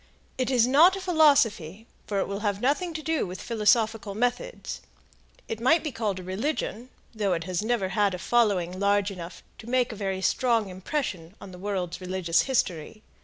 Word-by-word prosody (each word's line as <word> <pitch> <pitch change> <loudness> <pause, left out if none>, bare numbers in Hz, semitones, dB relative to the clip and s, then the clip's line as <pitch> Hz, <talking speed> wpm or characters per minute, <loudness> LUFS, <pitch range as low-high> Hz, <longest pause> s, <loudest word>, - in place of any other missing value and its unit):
It 255 - 0
is 245 -3 +4
not 310 +9 +6
a - - -5
philosophy, 275 - +2 0.2
for 200 -2 -1
it - - -1
will 200 0 -4
have 205 -2 -1
nothing 295 - 0
to 310 - -4
do 320 -8 0
with 185 +2 -7
philosophical 220 -2 +1
methods; 245 - -2 0.7
it 225 - -4
might 315 +7 +4
be 305 - -3
called 220 -5 -2
a - - -8
religion, 225 +4 -3 0.2
though 205 -4 0
it 165 -1 -2
has 180 +1 -2
never 220 -4 0
had 200 0 +1
a - - -5
following 185 -4 +1
large 200 0 +2
enough 175 -2 -9 0.2
to 230 - -10
make 255 -1 +1
a - - -7
very 195 -2 -3
strong 230 -4 +1
impression 185 - -4
on 195 - -10
the 180 - -11
world's 185 -3 -3
religious 180 -2 +1
history. 215 -4 -1
210 Hz, 185 wpm, -26 LUFS, 185-250 Hz, 0.7 s, not